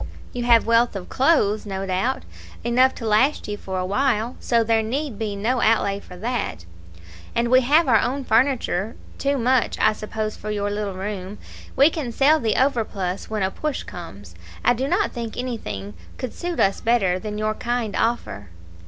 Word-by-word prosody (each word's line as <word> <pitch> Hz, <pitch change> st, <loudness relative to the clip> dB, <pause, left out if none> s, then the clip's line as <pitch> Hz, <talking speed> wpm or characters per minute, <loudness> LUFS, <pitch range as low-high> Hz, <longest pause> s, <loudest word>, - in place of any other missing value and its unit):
"You 245 Hz, -1 st, -3 dB
have 235 Hz, -2 st, +5 dB
wealth 230 Hz, 0 st, +3 dB
of 185 Hz, -2 st, -6 dB
clothes, 255 Hz, -7 st, +2 dB
no 195 Hz, -2 st, -4 dB
doubt; 190 Hz, +8 st, -1 dB, 0.4 s
enough 255 Hz, +2 st, +3 dB
to 230 Hz, -, -5 dB
last 235 Hz, +8 st, +2 dB
you 210 Hz, -, -3 dB
for 190 Hz, -2 st, -5 dB
a 185 Hz, -, -1 dB
while; 235 Hz, +3 st, 0 dB
so 235 Hz, -1 st, +2 dB
there 225 Hz, 0 st, +2 dB
need 255 Hz, +1 st, -3 dB
be 215 Hz, -2 st, -2 dB
no 235 Hz, +5 st, 0 dB
outlay 200 Hz, -3 st, +2 dB
for 180 Hz, -2 st, -12 dB
that." 195 Hz, -, -3 dB, 0.7 s
"And 235 Hz, 0 st, +1 dB
we 255 Hz, +1 st, +6 dB
have 295 Hz, +6 st, +4 dB
our 225 Hz, -4 st, +5 dB
own 270 Hz, +2 st, -1 dB
furniture 230 Hz, -4 st, +1 dB, 0.2 s
too 280 Hz, 0 st, +1 dB
much, 255 Hz, 0 st, +2 dB
I -, -, +4 dB
suppose 215 Hz, 0 st, -4 dB
for 215 Hz, -, -7 dB
your 205 Hz, -1 st, -1 dB
little 205 Hz, -2 st, -3 dB
room. 195 Hz, 0 st, -5 dB, 0.4 s
We 280 Hz, +4 st, +6 dB
can 290 Hz, -8 st, -4 dB
sell 290 Hz, +6 st, +4 dB
the 225 Hz, -5 st, 0 dB
overplus 215 Hz, -8 st, -1 dB
when 215 Hz, -2 st, -1 dB
a 190 Hz, -, 0 dB
push 305 Hz, +4 st, -3 dB
comes. 100 Hz, -, -10 dB, 0.3 s
I 245 Hz, -, +6 dB
do 260 Hz, +3 st, -2 dB
not 350 Hz, +5 st, +1 dB
think 230 Hz, -3 st, -6 dB
anything 215 Hz, -, -5 dB, 0.2 s
could 255 Hz, -, -5 dB
suit 350 Hz, -1 st, -4 dB
us 195 Hz, 0 st, +2 dB
better 200 Hz, -6 st, +2 dB
than 210 Hz, +1 st, -5 dB
your 215 Hz, 0 st, 0 dB
kind 235 Hz, -2 st, -2 dB
offer." 105 Hz, -, -1 dB
225 Hz, 185 wpm, -23 LUFS, 200-255 Hz, 0.7 s, we